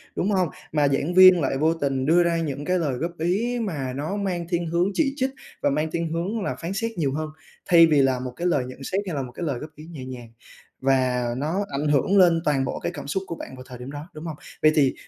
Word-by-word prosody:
đúng 200 +4 0
không? 185 -4 +2 0.2
Mà 150 -2 +3
giảng 140 +5 0
viên 185 -1 +8
lại 135 -1 0
vô 160 +3 +3
tình 135 -4 -1
đưa 170 +3 +5
ra 170 -1 +1
những 145 -3 -3
cái 185 0 +1
lời 150 -6 0
góp 170 +5 -2
ý 215 +9 0
mà 145 - -3
nó 150 +8 -3
mang 180 -4 -2
thiên 170 -1 -1
hướng 170 +3 +1
chỉ 280 -4 +1
trích 260 -1 0 0.3
và - - +3
mang 150 +3 -1
thiên 165 -1 -2
hướng 190 +7 -2
là - - -2
phán 170 +3 -5
xét 230 +3 -2
nhiều 140 -5 0
hơn, 155 +1 -3 0.4
thay 165 -2 +7
vì 150 -3 +4
là 130 -1 +2
một 125 -1 -5
cái 175 - -1
lời 145 -8 +1
nhận 130 +1 -9
xét 190 +8 -1
hay 170 - -3
là 140 - -1
một 125 -1 -7
cái 170 - -6
lời 135 -5 -2
góp 155 - -7
ý 155 - -11
nhẹ 155 -6 -8
nhàng. 120 -3 -9 0.5
Và 130 -2 +2
nó 165 +9 -1
ảnh 145 +2 -1
hưởng 150 +8 +3
lên 170 -3 +5
toàn 135 -3 +2
bộ - - -3
cái - - -3
cảm 145 -5 -8
xúc 190 +7 -1
của 170 - -4
bạn 130 - -9
vào 130 - -10
thời 125 -2 -9
điểm 125 +3 -8
đó, 145 +2 -7
đúng 155 +2 -8
không? 160 -2 -4 0.3
Vậy 155 - +6
thì, 140 -4 +4
155 Hz, 270 wpm, -24 LUFS, 135-175 Hz, 0.5 s, viên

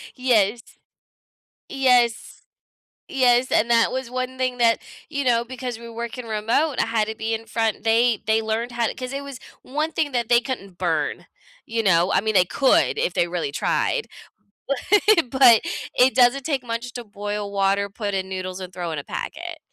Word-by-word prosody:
Yes, 235 -3 +2 1.1
yes, 250 -4 +1 0.7
yes 255 -1 +3
and 235 +2 +2
that 230 -1 +4
was 260 -2 -4
one 255 0 -4
thing 255 -1 -1
that 230 -1 +4 0.3
you 280 -3 -3
know, 235 -1 +2
because 250 -1 -6
we're 235 0 -10
working 235 +1 -6
remote, 225 +7 0
I - - +2
had 220 -1 0
to 220 - -3
be 225 +1 -2
in 225 0 -6
front 220 -1 -1
they 230 0 +3
they 220 0 +2
learned 225 +2 -2
how 235 -1 0
to - - -3
'cause 255 0 -6
it 280 +1 -4
was 275 -2 -8 0.2
one 305 +4 -3
thing 290 -3 -1
that 240 -2 -1
they 240 0 +5
couldn't 200 -8 -6
burn, 160 -5 -1 0.4
you 225 0 -2
know? 180 -1 +3
I - - +3
mean, 215 0 -1
they 180 -1 +5
could 280 - +2
if - - -1
they 175 - +2
really 170 -5 -3
tried, 465 - 0 0.8
but 415 - +4
but 235 -4 +8 0.3
it 255 +1 +4
doesn't 255 +2 +4
take 275 -4 -1
much 235 +1 -4
to 245 -1 -7
boil 205 0 -5
water, 200 0 +1
put 205 -1 -4
in 190 0 -2
noodles, 185 0 -5
and 185 -1 -8
throw 175 -2 -4
in 150 - -4
a - - -11
packet, - - -6
235 Hz, 190 wpm, -23 LUFS, 210-255 Hz, 1.1 s, but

